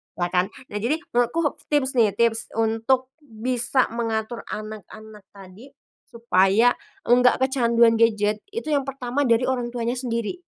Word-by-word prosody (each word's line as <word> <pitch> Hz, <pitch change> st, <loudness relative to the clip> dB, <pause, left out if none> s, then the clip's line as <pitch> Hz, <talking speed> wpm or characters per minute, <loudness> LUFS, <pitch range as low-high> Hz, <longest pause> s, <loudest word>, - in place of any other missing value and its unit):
lah 175 Hz, 0 st, -2 dB
kan. 180 Hz, 0 st, +2 dB, 0.2 s
Nah, 205 Hz, -, -3 dB
jadi 240 Hz, +8 st, 0 dB, 0.2 s
menurutku, 290 Hz, +6 st, 0 dB
tips 285 Hz, -3 st, +1 dB
nih 215 Hz, -4 st, +3 dB
tips 230 Hz, +1 st, +1 dB
untuk 225 Hz, +4 st, 0 dB
bisa 250 Hz, -1 st, -1 dB
mengatur 230 Hz, 0 st, -3 dB
anak-anak 215 Hz, -1 st, -9 dB
tadi 195 Hz, +7 st, -14 dB, 0.3 s
supaya 225 Hz, 0 st, +3 dB, 0.4 s
enggak 250 Hz, +1 st, +5 dB
kecanduan 235 Hz, -3 st, +3 dB
gadget, 215 Hz, -2 st, +2 dB
itu 440 Hz, -5 st, -5 dB
yang 285 Hz, -2 st, +2 dB
pertama 270 Hz, 0 st, -2 dB
dari 230 Hz, +1 st, +3 dB
orang 245 Hz, -2 st, -2 dB
tuanya 235 Hz, +1 st, -1 dB
sendiri 245 Hz, +6 st, -3 dB
235 Hz, 135 wpm, -23 LUFS, 220-255 Hz, 0.4 s, enggak